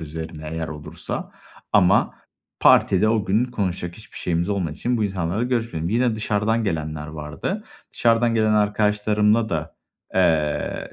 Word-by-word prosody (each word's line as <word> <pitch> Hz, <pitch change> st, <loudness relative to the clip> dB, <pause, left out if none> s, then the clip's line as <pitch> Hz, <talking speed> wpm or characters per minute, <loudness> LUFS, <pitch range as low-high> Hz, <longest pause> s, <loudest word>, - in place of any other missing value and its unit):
üzerine 80 Hz, 0 st, -7 dB
eğer 80 Hz, -1 st, -3 dB
olursa. 75 Hz, -1 st, -6 dB, 0.4 s
Ama 100 Hz, -1 st, +4 dB, 0.5 s
partide 100 Hz, +3 st, +5 dB
o 110 Hz, -2 st, +1 dB
gün 110 Hz, +5 st, +2 dB
konuşacak 90 Hz, -7 st, -3 dB
hiçbir 110 Hz, -, -15 dB
şeyimiz 85 Hz, +1 st, -1 dB
olmadığı 95 Hz, -7 st, -1 dB
için 120 Hz, +9 st, -1 dB
bu 110 Hz, -, 0 dB
insanlarla 95 Hz, +2 st, -1 dB
görüşmedim. 115 Hz, -10 st, -1 dB
Yine 115 Hz, +1 st, +1 dB
dışarıdan 110 Hz, +1 st, 0 dB
gelenler 75 Hz, -5 st, -3 dB
vardı. 80 Hz, -, -5 dB, 0.3 s
Dışarıdan 115 Hz, 0 st, +2 dB
gelen 110 Hz, -1 st, +3 dB
arkadaşlarımla 105 Hz, +1 st, +2 dB
da, 80 Hz, -2 st, -4 dB, 0.4 s
eee, 80 Hz, -5 st, +1 dB
100 Hz, 130 wpm, -23 LUFS, 80-110 Hz, 0.5 s, partide